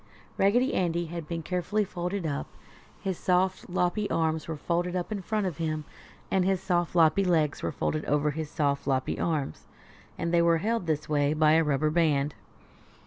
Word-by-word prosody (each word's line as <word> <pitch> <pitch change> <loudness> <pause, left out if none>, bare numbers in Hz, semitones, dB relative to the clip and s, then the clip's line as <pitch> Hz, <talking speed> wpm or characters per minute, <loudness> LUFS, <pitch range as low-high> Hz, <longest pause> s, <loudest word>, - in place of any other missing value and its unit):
Raggedy 245 +7 +3
Andy 170 -1 0
had 165 -1 -6
been 165 0 -4
carefully 180 +5 0
folded 180 +1 -3
up. 145 -3 -2 0.5
His 190 -3 -3
soft, 185 +1 +1
loppy 180 +3 0
arms 160 -1 0
were 160 -2 -4
folded 175 +3 -1
up 180 +3 -3
in 205 -2 -2
front 210 +2 -1
of 175 -6 -3
him 155 -2 -2 0.5
and 190 - +3
his 190 0 +1
soft, 175 -2 0
loppy 165 +3 +5
legs 160 -5 +1
were - - -1
folded 155 - -2
over 150 +1 +1
his 155 0 -4
soft, 145 -3 -1
loppy 130 -1 0
arms, 150 - -2 0.5
and 170 0 -2
they 170 - +5
were 170 0 +4
held 215 +1 -1
this 155 -1 -1
way 145 -1 +2
by 155 0 +4
a 165 +1 +5
rubber 150 0 +1
band. 150 -3 +2
170 Hz, 185 wpm, -28 LUFS, 155-180 Hz, 0.5 s, loppy